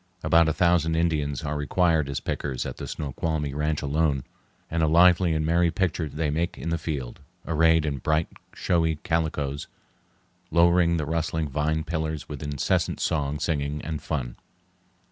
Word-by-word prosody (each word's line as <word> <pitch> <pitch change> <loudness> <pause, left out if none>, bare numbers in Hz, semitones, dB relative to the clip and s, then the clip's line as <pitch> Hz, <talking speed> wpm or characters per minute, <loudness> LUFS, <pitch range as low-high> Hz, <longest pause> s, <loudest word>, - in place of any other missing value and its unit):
About 80 +1 +4
a - - +1
thousand 85 -2 +2
Indians 75 -4 0
are 75 0 -2
required 80 0 +1
as 70 - -2
pickers 65 -4 -3
at - - -6
the - - -6
Snoqualmie 75 0 -3
ranch 75 +1 -1
alone, 70 -2 +1 0.4
and 85 0 -1
a 80 - +3
lively 85 +2 +5
and 80 0 0
merry 85 +1 +3
picture 85 -4 -1
they 75 +1 -2
make 85 +3 -1
in 85 - -4
the 85 0 -1
field, 70 -6 -4 0.3
arrayed 80 0 +3
in 70 -3 -2
bright, 80 +4 +1 0.3
showy 80 -2 +1
calicoes, 75 -4 -1 0.8
lowering 85 0 +4
the 75 - -2
rustling 80 0 -1
vine 75 +3 0
pillars 80 -1 -3
with 75 -3 -7
incessant 75 -2 -1
song 75 -3 -1
singing 75 -1 -1
and 75 -2 -4
fun. 65 -7 -4
80 Hz, 160 wpm, -26 LUFS, 75-85 Hz, 0.8 s, lively